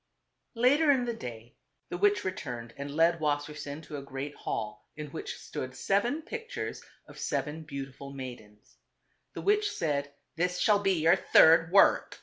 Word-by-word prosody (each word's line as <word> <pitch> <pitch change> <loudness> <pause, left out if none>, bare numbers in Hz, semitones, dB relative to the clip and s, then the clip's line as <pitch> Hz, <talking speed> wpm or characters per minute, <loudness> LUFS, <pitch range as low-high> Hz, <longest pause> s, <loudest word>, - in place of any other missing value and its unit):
Later 280 +7 +4
in 260 -3 +4
the 240 - -2
day 120 - -8 0.4
the - - -3
witch 205 +1 +3
returned 120 -11 -5
and 140 +1 -6
led 165 +1 +4
Wassersein 150 0 -3
to 150 - -7
a - - -5
great 140 +1 -6
hall, 105 -5 -5
in 150 -2 -7
which 160 - -6
stood 130 0 -6
seven 240 +11 0
pictures 455 +6 -5 0.3
of - - -13
seven 155 +1 -2
beautiful 140 -2 -7
maidens. 120 -6 -10 0.6
The - - -6
witch 415 +1 +3
said, 145 -3 -2 0.2
"This 180 +2 0
shall 210 +1 +4
be 195 -1 +2
your 165 +3 +6
third 165 -1 +6
work. 195 - +4
155 Hz, 155 wpm, -29 LUFS, 140-205 Hz, 0.6 s, your